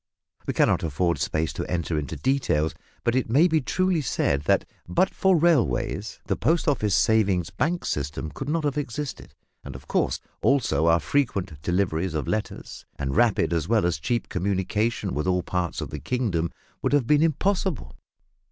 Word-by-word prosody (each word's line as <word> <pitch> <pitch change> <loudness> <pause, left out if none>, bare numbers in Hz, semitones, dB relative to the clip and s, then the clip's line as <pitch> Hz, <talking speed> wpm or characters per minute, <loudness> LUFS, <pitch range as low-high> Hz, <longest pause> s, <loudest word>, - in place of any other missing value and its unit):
We - - -2
cannot - - +3
afford 85 0 0
space 80 +3 -1
to - - -5
enter 85 -2 -1
into 75 -4 -3
details, 125 - +1 0.3
but 120 - +2
it 130 -2 0
may 145 +9 +5
be 160 -3 +2
truly 185 +4 +1
said 70 - 0
that - - +3 0.2
but 90 - +1
for 190 -2 +3
railways 155 - +1
the - - 0
Post 160 +9 +1
Office 110 -9 +2
Savings 100 -6 +2
Bank 175 +3 -1
system 75 +2 -3
could 135 - -6
not 160 +1 0
have 145 0 0
existed; 140 +1 -5 0.3
and 70 -2 -8
of 65 - -11
course, - - 0 0.2
also, 115 - +2
our 85 0 +5
frequent 95 - -1
deliveries 85 0 0
of 75 -5 -2
letters 110 -1 -4
and 70 -1 -2
rapid 115 -7 +3
as 80 -1 -1
well 110 -3 +2
as 85 -2 0
cheap 120 +9 -1
communication 100 - -1
with 75 +6 -2
all 90 -1 +1
parts 90 -2 -2
of - - -5
the - - -5
kingdom 100 -10 -1 0.3
would - - 0
have 145 -4 +3
been 150 +4 +4
impossible. 165 - 0
100 Hz, 175 wpm, -25 LUFS, -, 0.3 s, may